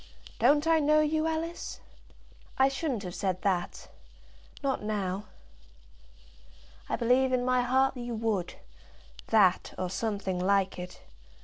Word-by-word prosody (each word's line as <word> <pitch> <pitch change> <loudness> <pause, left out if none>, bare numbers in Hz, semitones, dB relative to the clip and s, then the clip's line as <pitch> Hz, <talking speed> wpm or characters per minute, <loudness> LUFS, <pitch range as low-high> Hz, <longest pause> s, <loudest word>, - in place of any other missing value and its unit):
Don't 295 +1 +4
I 325 0 +4
know 305 +1 +4
you, 310 +1 +1
Alice?" 325 +1 -4 0.8
"I 265 +1 +5
shouldn't 270 -6 -3
have 180 -2 -6
said 185 -1 -2
that; 185 -3 -1 0.8
not 270 -1 0
now." 205 -2 -2 1.6
"I - - +1
believe 255 +2 +2
in 250 -1 +1
my 255 0 +3
heart 265 +2 +2
you 240 -1 -5
would; 215 -6 -2 0.7
that, 195 -5 +3
or 185 -1 -3
something 200 -3 -2
like 195 0 +1
it. 180 0 -8
235 Hz, 125 wpm, -29 LUFS, 195-270 Hz, 1.6 s, I